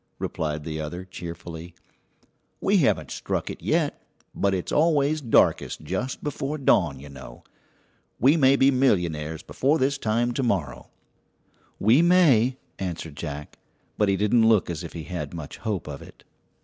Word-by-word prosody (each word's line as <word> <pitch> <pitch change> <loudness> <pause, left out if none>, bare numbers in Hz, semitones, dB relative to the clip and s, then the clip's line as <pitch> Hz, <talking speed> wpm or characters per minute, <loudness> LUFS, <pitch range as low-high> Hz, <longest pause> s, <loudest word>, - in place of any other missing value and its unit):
replied 75 -1 -3
the 80 0 -5
other 85 +5 -6
cheerfully; 85 -1 -8 0.8
"we - - +2
haven't - - +1
struck - - -3
it - - -10
yet, - - 0 0.3
but 100 - +1
it's 95 -2 -3
always 155 -1 +2
darkest 120 -5 +2
just 130 +1 -4
before 145 0 -3
dawn, 135 - +2
you 70 - -11
know. 65 -4 -12 0.8
We 140 +5 +5
may 135 -4 +5
be 135 0 +4
millionaires 85 - 0
before 145 +4 +1
this 135 -1 0
time 115 +2 0
to 130 - -2
morrow." 80 - -2 0.9
"We 115 +9 +5
may," 145 -9 +4 0.2
answered 85 -5 -5
Jack; 75 0 -7 0.4
but 105 -2 +2
he 100 - +2
didn't 110 +3 +3
look 105 -5 +3
as 85 0 -5
if 85 - -8
he 80 - -6
had 85 +3 -5
much 80 -4 -7
hope 105 -8 -3
of 70 -2 -7
it. - - -15
100 Hz, 155 wpm, -25 LUFS, 80-130 Hz, 0.9 s, We